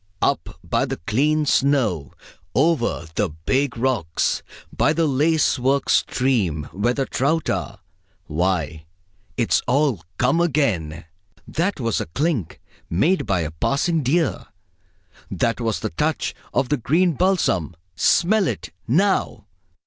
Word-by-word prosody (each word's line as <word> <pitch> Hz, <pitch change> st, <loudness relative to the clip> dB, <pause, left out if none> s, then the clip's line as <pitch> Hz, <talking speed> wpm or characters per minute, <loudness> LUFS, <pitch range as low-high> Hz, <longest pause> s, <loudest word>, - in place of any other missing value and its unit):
Up -, -, 0 dB
by -, -, 0 dB
the -, -, -4 dB
clean 150 Hz, -, +1 dB
snow; 125 Hz, -, +1 dB, 0.4 s
over 140 Hz, -, +1 dB
the 105 Hz, +1 st, 0 dB
big 125 Hz, -, -1 dB
rocks; 115 Hz, -10 st, 0 dB, 0.3 s
by 150 Hz, -, +3 dB
the 165 Hz, +1 st, +1 dB
lace 150 Hz, +1 st, +2 dB
work 135 Hz, +2 st, +1 dB
stream 105 Hz, -, +1 dB
where 120 Hz, +6 st, 0 dB
the 135 Hz, -, 0 dB
trout 150 Hz, +5 st, 0 dB
are -, -, -4 dB, 0.4 s
why, 80 Hz, -2 st, -1 dB, 0.5 s
it's 120 Hz, -3 st, +2 dB
all 135 Hz, -, +2 dB, 0.2 s
come 135 Hz, +7 st, +2 dB
again! 100 Hz, -, 0 dB, 0.4 s
That 180 Hz, +3 st, -1 dB
was 115 Hz, -4 st, 0 dB
the -, -, -4 dB
clink 130 Hz, -, -2 dB, 0.3 s
made 150 Hz, -, +1 dB
by 95 Hz, -4 st, +1 dB
a 80 Hz, 0 st, -3 dB
passing 145 Hz, -, 0 dB
deer. 145 Hz, +4 st, 0 dB, 0.8 s
That 115 Hz, +1 st, -1 dB
was 115 Hz, -2 st, -1 dB
the 110 Hz, -, -3 dB
touch 155 Hz, +1 st, -1 dB, 0.2 s
of 130 Hz, -, 0 dB
the 150 Hz, -, +2 dB
green 165 Hz, +9 st, +2 dB
balsam 150 Hz, -, +1 dB, 0.2 s
smell 190 Hz, -, +3 dB
it, -, -, -4 dB, 0.2 s
now! 190 Hz, -, +1 dB
130 Hz, 130 wpm, -22 LUFS, 95-155 Hz, 0.8 s, by